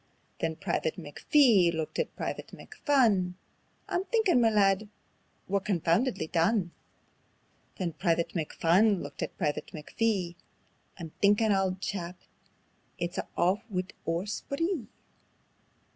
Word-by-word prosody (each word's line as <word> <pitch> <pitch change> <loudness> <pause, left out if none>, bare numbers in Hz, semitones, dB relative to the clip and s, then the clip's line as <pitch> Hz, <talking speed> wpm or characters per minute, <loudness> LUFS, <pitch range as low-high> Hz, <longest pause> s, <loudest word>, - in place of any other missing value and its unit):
Then 160 - -1
Private 160 0 -2
McPhee 185 - +4
looked 160 -2 -4
at 485 - -2
Private - - -4
McPhun: 215 - +1 0.5
"I'm 355 - -1
thinkin', 430 - +3
ma 230 - +5
lad, 205 -1 +2 0.6
we're 200 +1 +1
confoundedly 190 - +1
done." 175 +3 +1 1.1
Then 175 -3 -2
Private 165 +2 0
McPhun 180 +5 +2
looked - - -8
at - - -4
Private 150 -5 -1
McPhee: 180 +3 -2 0.6
"I'm 165 -4 -7
thinkin' 210 +2 +4
auld 190 -1 +1
chap, 180 -3 -4 0.8
it's 175 +1 -3
a' - - -4
aff 185 +5 +2
wi' 185 -3 -1 0.2
oor 165 +3 0
spree." 280 - -2
190 Hz, 115 wpm, -29 LUFS, 170-220 Hz, 1.1 s, ma